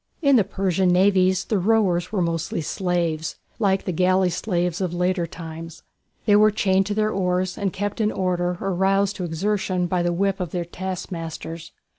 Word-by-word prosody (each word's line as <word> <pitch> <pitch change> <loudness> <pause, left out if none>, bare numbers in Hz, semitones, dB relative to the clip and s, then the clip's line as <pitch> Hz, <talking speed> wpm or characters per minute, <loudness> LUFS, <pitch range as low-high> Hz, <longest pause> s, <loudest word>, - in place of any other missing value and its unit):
In 280 -2 +5
the 225 - +5
Persian 190 -1 0
navies 185 0 +3
the 210 - 0
rowers 185 -3 +2
were 195 -5 +1
mostly 165 -1 -2
slaves, 165 -1 -1 0.2
like 195 -3 +1
the - - -1
galley 185 +1 +2
slaves 180 -1 -1
of 175 -2 -2
later 180 -1 0
times. 165 -1 -9 0.4
They 205 -2 +5
were 215 +1 +6
chained 195 -2 +1
to 205 - -2
their 215 0 +1
oars, 180 -1 0
and 200 -3 -1
kept 205 +4 -3
in 215 0 +2
order 180 -1 -1
or 195 -1 -2
roused 195 +2 +1
to 185 - -4
exertion 185 +2 -1
by 175 0 0
the 175 0 +1
whip 195 +3 0
of 180 -2 -3
their 175 +1 -3
taskmasters. 170 -3 -6
185 Hz, 180 wpm, -23 LUFS, 175-195 Hz, 0.4 s, were